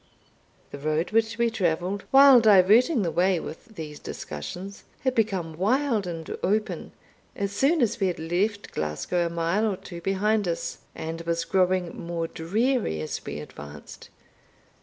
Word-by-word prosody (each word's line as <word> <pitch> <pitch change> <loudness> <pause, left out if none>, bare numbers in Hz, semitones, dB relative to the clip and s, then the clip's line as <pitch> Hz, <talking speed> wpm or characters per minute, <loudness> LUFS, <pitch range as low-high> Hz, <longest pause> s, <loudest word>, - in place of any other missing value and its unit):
The 140 - -7
road 155 +4 -1
which 225 0 +1
we 235 -1 +2
travelled, 185 -1 -1
while 270 -1 +8
diverting 220 - +5
the 170 - -1
way 180 +1 +2
with 220 +8 -9
these 150 -4 -7
discussions, 180 - -7 0.2
had 260 -2 +1
become 190 -9 -1
wild 225 - +1
and 165 -2 -5
open, 210 +3 -1 0.4
as 200 0 -2
soon 275 +8 +2
as 235 +1 0
we 195 - +2
had 180 - -2
left 190 +6 -1
Glasgow 80 - -1
a - - -4
mile 170 +6 0
or 190 - -4
two 170 -2 -9
behind 205 +2 +1
us, 170 -1 -3 0.2
and 165 +1 -5
was 170 0 -1
growing 185 -2 +1
more 170 -1 -3
dreary 210 - 0
as 75 - -4
we - - -5
advanced. 75 0 -11
185 Hz, 155 wpm, -26 LUFS, 165-220 Hz, 0.4 s, while